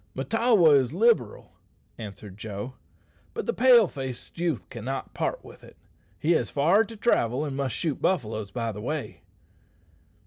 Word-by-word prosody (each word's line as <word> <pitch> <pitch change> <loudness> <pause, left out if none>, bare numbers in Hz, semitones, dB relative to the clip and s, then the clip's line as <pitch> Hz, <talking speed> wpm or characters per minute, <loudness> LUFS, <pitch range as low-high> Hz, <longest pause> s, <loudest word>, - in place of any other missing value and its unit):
"Mahtawa 210 - +3
is 130 0 0
liberal," 210 - +1 0.4
answered 105 -2 -9
Joe; 105 +3 -6 0.6
"but 455 - -3
the 475 - 0
pale 245 - +6
faced 130 +1 -7
youth 165 - -1
cannot 130 +3 -5
part - - -3
with - - -14
it. - - -16 0.4
He 160 - 0
has 170 - +2
far 170 +9 +3
to 225 +1 -10
travel, 140 - +1
and 140 -2 -4
must 135 -4 -2
shoot 155 -5 -2
buffaloes 110 - -1
by 115 +2 -3
the 105 0 -8
way." 150 +5 -4
140 Hz, 150 wpm, -26 LUFS, 115-190 Hz, 0.6 s, pale